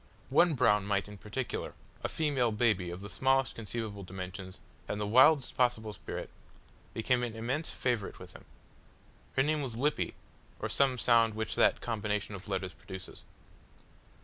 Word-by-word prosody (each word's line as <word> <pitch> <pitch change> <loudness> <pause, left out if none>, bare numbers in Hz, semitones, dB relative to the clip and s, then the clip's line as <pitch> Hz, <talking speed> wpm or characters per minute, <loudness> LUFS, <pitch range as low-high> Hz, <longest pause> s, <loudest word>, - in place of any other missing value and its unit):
One 175 -3 +5
brown 105 -5 +3
mite 100 -1 +1
in 105 -1 -10
particular 125 +4 -4 0.3
a - - 0
female 140 -7 +1
baby 105 -5 +2
of 90 +2 -6
the 100 - -6
smallest 135 0 +2
conceivable 110 -2 -4
dimensions, 95 0 -7 0.3
and 105 - -3
the 105 - -1
wildest 130 +6 +5
possible 115 -4 +1
spirit 80 -8 -6 0.6
became 125 +2 +2
an 120 -2 -3
immense 125 +8 -2
favourite 120 -6 -1
with - - -11
him. - - -14 0.9
Her 135 - +4
name 155 +1 +1
was 125 -5 -4
Lippy, 145 +4 0 0.4
or - - -2
some 135 -2 +2
sound 115 -2 +4
which 110 0 -2
that - - +3
combination 105 -3 -2
of 100 +2 -8
letters 95 -2 -2
produces. 95 -1 -10
110 Hz, 155 wpm, -31 LUFS, 100-125 Hz, 0.9 s, One